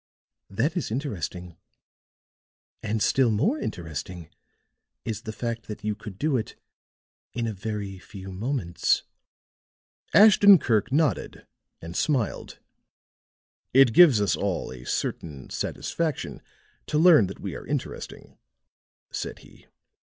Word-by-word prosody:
That 130 - -1
is 175 - -2
interesting. 90 - -5 1.2
And 110 0 -1
still 130 -3 +3
more 210 - +1
interesting 85 - -6 0.8
is 110 -2 -3
the 110 - -6
fact 115 +1 -4
that 105 -1 -7
you 105 0 0
could 105 -2 -10
do 145 +2 +1
it 110 - -5 0.8
in 120 -1 -2
a 110 - -2
very 100 -1 -5
few 95 0 -10
moments." 95 -3 0 1.1
Ashton 205 -1 +8
Kirk 110 - 0
nodded 150 +2 0 0.4
and 85 +1 -7
smiled. 135 -9 -1 1.2
"It 135 -4 +7
gives 150 -7 +7
us 100 - +2
all 95 -9 -2
a 60 -1 -10
certain 70 -5 -4
satisfaction 160 -5 -3 0.5
to 150 - 0
learn 155 - +6
that 95 - -9
we - - -5
are - - -9
interesting," - - -6 0.7
said - - -5
he. - - -19
110 Hz, 120 wpm, -26 LUFS, 95-140 Hz, 1.2 s, Ashton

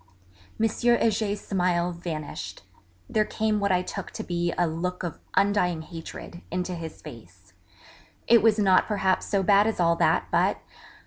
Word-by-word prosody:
M. 225 - +4
Heger's 220 -3 +1
smiles 180 -2 0
vanished; 160 -4 -6 0.4
there 215 - +2
came 215 0 -1
what 200 -1 +1
I 180 0 +2
took - - -6
to - - -5
be 175 -1 -1
a 175 - +1
'look 175 +3 -3
of 170 -3 -5 0.2
undying 190 -5 +2
hatred' 165 +1 -9
into 180 +1 -2
his 165 -2 -8
face - - -13 0.7
it 235 -2 +6
was 220 0 +4
not 195 -3 +4
perhaps 195 -3 0
so 200 -2 +1
bad 200 +2 +5
as 225 - -2
all 170 -1 +3
that, 160 -1 +2
but - - +2
185 Hz, 155 wpm, -26 LUFS, 170-210 Hz, 0.7 s, it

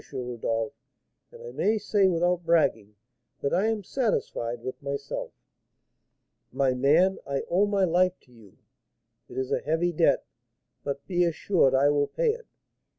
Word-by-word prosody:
Rodolph; 120 -4 -3 0.6
and 475 0 -13
I 480 - -8
may 220 - +1
say, 205 -2 +2
without 175 0 +1
bragging, 115 -11 +1 0.5
that 140 - -1
I 195 +5 +2
am 220 -2 -1
satisfied 120 - -2
with 130 - -6
myself." 140 0 -4 1.2
"My 135 -2 +1
man, 155 +9 +3
I 140 -1 -2
owe 195 +4 +3
my 200 -1 +1
life 180 +1 +2
to 125 - -26
you; 110 -5 -18 0.7
it 125 - -10
is 130 0 -2
a - - +2
heavy 165 +3 0
debt, 165 +1 +2 0.6
but 140 0 -4
be 180 -2 +1
assured 170 -4 +2
I 140 +2 +4
will 145 -1 +1
pay - - +1
it. 470 +2 -9
165 Hz, 150 wpm, -27 LUFS, 130-190 Hz, 1.2 s, I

